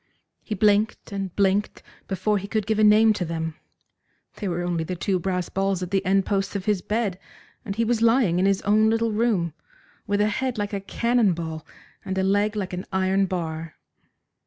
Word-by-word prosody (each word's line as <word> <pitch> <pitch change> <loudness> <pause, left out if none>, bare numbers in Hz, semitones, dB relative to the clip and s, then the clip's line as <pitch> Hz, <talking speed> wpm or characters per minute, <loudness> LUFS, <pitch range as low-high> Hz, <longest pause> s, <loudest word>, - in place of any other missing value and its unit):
He 215 - -4
blinked 210 +2 +1
and 195 -2 -3
blinked 200 +1 +1 0.2
before 200 +2 0
he 200 - -7
could 215 0 -1
give 215 0 0
a - - +4
name 215 +1 +6
to 200 - -3
them. 160 -1 -3 0.8
They 205 - -4
were 175 -1 -2
only 175 -2 -1
the 180 +3 -4
two 185 +2 0
brass 180 -1 -2
balls 195 -1 -1
at 180 - -6
the 195 -1 +1
end 195 +1 +2
posts 195 0 -1
of 195 -1 -3
his 210 -4 +1
bed, 210 -3 -1 0.4
and 195 - -5
he 230 +1 +1
was 230 0 0
lying 230 -7 +3
in 190 - +3
his 195 0 +1
own 215 +1 +4
little 225 0 +1
room, 210 -7 +1 0.5
with 205 0 +1
a 210 - +4
head 250 +3 -1
like 205 0 -3
a 200 - -2
cannon 235 0 +1
ball, 160 -2 -6 0.4
and 190 0 -4
a 190 - +1
leg 205 +2 +1
like 190 -3 -3
an 180 +1 -5
iron 190 +1 +1
bar. 165 -3 -4
195 Hz, 205 wpm, -24 LUFS, 185-215 Hz, 0.8 s, name